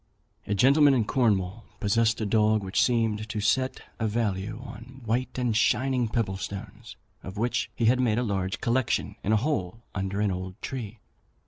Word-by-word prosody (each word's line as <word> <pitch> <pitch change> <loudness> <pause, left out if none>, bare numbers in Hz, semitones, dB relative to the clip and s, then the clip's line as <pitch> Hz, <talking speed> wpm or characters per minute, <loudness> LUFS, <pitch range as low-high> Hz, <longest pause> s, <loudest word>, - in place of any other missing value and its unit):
A 105 - 0
gentleman 140 +6 +5
in 115 -4 +2
Cornwall 105 -4 +1 0.2
possessed 115 +2 +2
a - - 0
dog, 110 0 +3
which 95 0 +1
seemed 110 -3 +1
to 110 - -3
set 130 +6 +1 0.2
a 110 - +1
value 105 -1 -2
on 120 +3 -11
white 120 +4 -1
and 125 -3 0
shining 125 +2 +2
pebble 105 -4 -1
stones, 95 +1 -7 0.3
of 95 +2 -8
which 120 +3 0
he 115 - 0
had 125 +3 +4
made 115 -4 +2
a 125 - +1
large 95 -4 -2
collection 120 +1 0
in 105 - 0
a 110 - +5
hole 115 - -2
under 95 +1 -2
an 105 -1 +2
old 95 +2 -5
tree. 120 -5 -5
110 Hz, 180 wpm, -27 LUFS, 100-120 Hz, 0.3 s, gentleman